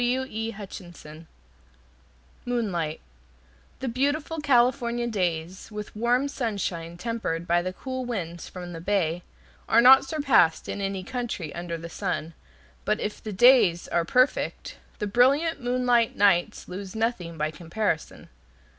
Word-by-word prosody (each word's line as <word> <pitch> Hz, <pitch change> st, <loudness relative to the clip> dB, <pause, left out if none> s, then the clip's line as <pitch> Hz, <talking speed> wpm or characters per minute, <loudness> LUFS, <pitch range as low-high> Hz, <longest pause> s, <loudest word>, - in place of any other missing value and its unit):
Moonlight 190 Hz, -11 st, -2 dB, 0.8 s
The 265 Hz, -, -2 dB
beautiful 285 Hz, +6 st, -1 dB
California 240 Hz, -3 st, +2 dB
days, 180 Hz, -5 st, -2 dB
with 210 Hz, 0 st, -7 dB
warm 245 Hz, +5 st, +2 dB
sunshine 195 Hz, -10 st, -3 dB
tempered 200 Hz, -6 st, -3 dB
by 175 Hz, +1 st, +3 dB
the 185 Hz, +1 st, -3 dB
cool 260 Hz, +6 st, -5 dB
winds 175 Hz, -9 st, -5 dB
from 180 Hz, -1 st, -8 dB
the 165 Hz, -, -7 dB
bay, 175 Hz, -3 st, 0 dB, 0.5 s
are 225 Hz, -, +6 dB
not 260 Hz, +3 st, +8 dB
surpassed 270 Hz, -, +2 dB
in 205 Hz, -, -4 dB
any 195 Hz, -1 st, -2 dB
country 235 Hz, -8 st, -4 dB
under 170 Hz, -1 st, -4 dB
the 165 Hz, +1 st, -8 dB
sun. 170 Hz, -2 st, -3 dB, 0.5 s
But -, -, 0 dB
if 210 Hz, -, -4 dB
the 215 Hz, -, -6 dB
days 210 Hz, -5 st, +5 dB
are 170 Hz, -, +1 dB
perfect, 255 Hz, +10 st, +1 dB, 0.2 s
the 210 Hz, -, -2 dB
brilliant 275 Hz, +9 st, +3 dB
moonlight 245 Hz, -2 st, +2 dB
nights 195 Hz, -4 st, +2 dB
lose 190 Hz, +2 st, -7 dB
nothing 220 Hz, -8 st, -2 dB
by 155 Hz, 0 st, -1 dB
comparison. 170 Hz, +2 st, -3 dB
210 Hz, 125 wpm, -26 LUFS, 175-245 Hz, 0.8 s, not